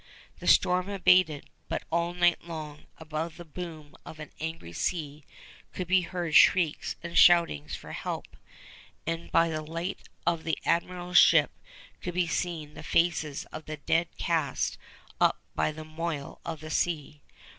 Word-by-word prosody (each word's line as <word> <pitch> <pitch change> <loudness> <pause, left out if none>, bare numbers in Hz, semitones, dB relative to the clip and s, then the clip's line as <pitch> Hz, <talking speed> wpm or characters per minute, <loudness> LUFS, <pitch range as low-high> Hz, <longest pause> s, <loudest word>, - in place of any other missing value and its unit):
The - - -7
storm 180 +2 +4
abated, 180 -6 +3 0.2
but - - -2
all 170 +1 0
night 175 -1 +3
long, 155 -3 -8
above 160 +1 -5
the 175 - -9
boom 160 -2 -8
of 155 - -11
an 155 - -8
angry 160 - -5
sea, 150 - -3 0.5
could 185 - -4
be 185 +1 +4
heard 175 -2 -4
shrieks 165 -1 +4
and 170 0 -6
shoutings 170 - +5
for - - -10
help; - - -5 0.7
and 165 +1 -4
by 165 0 +4
the 155 -1 -2
light 165 +5 -5 0.2
of 170 -1 +1
the 160 - -1
Admiral's 175 +1 +2
ship - - +6 0.5
could 175 -1 -5
be 180 -1 +2
seen 165 -3 -3
the 155 - -9
faces 155 -3 0
of 155 - -8
the 155 0 -6
dead 165 +4 +1
cast 160 -6 -1 0.4
up - - +3
by - - +1
the 155 +1 -9
moil 155 -2 -5
of 160 -2 -5
the 155 0 -7
sea. 150 -3 -1
165 Hz, 155 wpm, -28 LUFS, 155-175 Hz, 0.7 s, ship